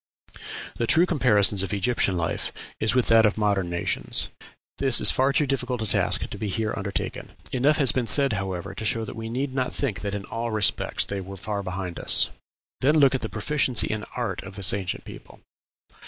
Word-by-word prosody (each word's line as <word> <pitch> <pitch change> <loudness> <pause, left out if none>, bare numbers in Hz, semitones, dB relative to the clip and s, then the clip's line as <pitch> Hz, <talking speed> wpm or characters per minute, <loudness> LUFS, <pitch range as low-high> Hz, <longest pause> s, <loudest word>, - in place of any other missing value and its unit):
"The 115 - -1
true 170 +8 +5
comparison 105 - +3
of 100 - -3
Egyptian 100 -3 0
life 85 -1 -2 0.3
is 110 +3 +1
with 125 - +3
that 115 -1 +6
of 105 -1 +2
modern 100 -4 0
nations. 85 0 -1 0.5
This 135 -3 +6
is - - +6
far 135 +1 +2
too 150 +1 +2
difficult 125 -3 -2
a - - -3
task 100 - 0
to - - -8
be 105 - -3
here 110 +2 -2
undertaken. 100 0 -5 0.2
Enough 140 +4 +2
has 140 -4 +5
been 125 -3 -2
said, 140 -2 +4
however, 95 -3 -4
to - - -7
show 110 +1 -1
that - - -8
we 115 0 -6
need 130 +3 -3
not 130 -1 -1
think 105 - -3
that 100 0 -3
in 100 -1 -5
all 115 +1 -4
respects 110 -2 +1
they 100 -1 -4
were 95 +1 -9
far 100 +2 -4
behind 90 -2 -5
us." - - +3 0.5
Then 150 +4 +3
look 140 -3 +5
at 130 - -1
the 110 - -4
proficiency 125 +2 +1
in 105 -1 -3
art 115 -7 -3
of 95 0 -11
this 95 -1 +4
ancient 95 -2 -4
people. - - -12
110 Hz, 205 wpm, -25 LUFS, 100-130 Hz, 0.5 s, that